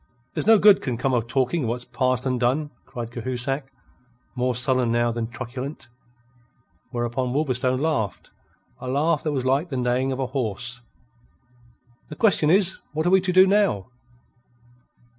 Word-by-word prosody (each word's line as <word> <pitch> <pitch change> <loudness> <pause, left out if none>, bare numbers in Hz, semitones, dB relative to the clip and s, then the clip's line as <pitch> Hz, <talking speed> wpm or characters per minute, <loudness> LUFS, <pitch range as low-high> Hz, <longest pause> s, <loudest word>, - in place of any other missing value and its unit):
"There's - - -3
no 225 0 +8
good 205 -1 +6
can 125 -3 -3
come 130 +2 0
of 120 -2 0
talking 135 +6 0
of 120 - -1
what's 120 +1 -3
past 130 -1 -1
and 125 -2 0
done," 140 +5 0 0.2
cried 120 -3 -6
Cahusac, 130 +3 -3 0.6
more 125 0 0
sullen 125 -1 +1
now 120 0 +2
than 115 -1 -3
truculent. 130 +4 -7 1.0
Whereupon 120 +1 -2
Wolverstone 130 -3 0
laughed, 145 -10 -2 0.5
a 130 - -7
laugh 145 +4 +1
that 155 - -2
was 130 -3 -2
like 140 +6 +1
the 135 - -3
neighing 125 +2 0
of 130 - -3
a 135 - -1
horse. 125 -1 -3 1.3
"The 150 - -7
question 170 -6 +3
is: 190 +1 +3
what 155 +1 -1
are 175 - +3
we 190 0 +5
to 185 0 -1
do 185 +1 +7
now?" 195 - +1
130 Hz, 160 wpm, -24 LUFS, 120-150 Hz, 1.3 s, no